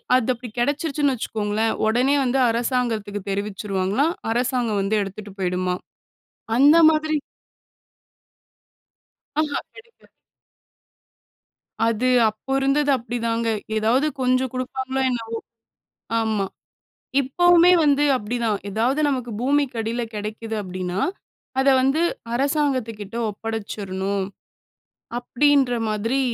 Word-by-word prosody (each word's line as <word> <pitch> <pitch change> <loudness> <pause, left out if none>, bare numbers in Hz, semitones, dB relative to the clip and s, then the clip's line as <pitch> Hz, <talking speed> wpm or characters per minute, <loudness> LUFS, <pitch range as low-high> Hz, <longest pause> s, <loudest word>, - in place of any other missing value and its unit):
அது 255 -3 +2
அப்படி 245 0 -9
கிடைச்சுருச்சுன்னு 285 +1 +1
வைச்சுக்கோங்களேன். 220 -2 -1
உடனே 250 +6 +3
வந்து 260 +1 +1
அரசாங்கத்துக்கு 230 -4 -1
தெரிவிச்சிடுவாங்களாம். 200 - -1 0.2
அரசாங்கம் 245 -3 0
வந்து 195 +2 0
எடுத்துட்டு 200 +1 -6
போய்டுமாம். 180 0 -1 0.8
அந்த 290 +5 +7
மாதிரி 310 0 +1 2.3
ஆஹ 300 -2 -1 0.2
கெடைக்காது. 470 -1 -18 1.7
அது 230 +2 +1 0.2
அப்போ 215 +5 -14
இருந்தது 280 +2 +2
அப்டிதாங்க. 230 -1 -2 0.3
ஏதாவது 235 +7 +2
கொஞ்சம் 255 0 +2
குடுப்பாங்களோ, 260 +1 -3
என்னவோ! 230 -2 -3 0.9
ஆமா. 220 -3 0 0.8
இப்போவுமே 350 +6 +5
வந்து 290 0 +3
அப்பிடித்தான். 230 -2 -1
ஏதாவது 235 +8 0
நமக்கு 250 -4 -2
பூமிக்கு 275 -2 +1
அடியில 230 +2 -2
கிடைக்குது 220 +2 -5
அப்பிடின்னா, 185 0 -4 0.6
அத 265 - +2
வந்து 270 +5 +2 0.3
அரசாங்கத்துக்கிட்ட 255 -6 -1
ஒப்படைச்சுறணும், 200 -3 -3 0.9
அப்பிடீன்ற 270 +1 +2 0.2
மாதிரி 225 +5 0
240 Hz, 90 wpm, -23 LUFS, 210-270 Hz, 2.3 s, அந்த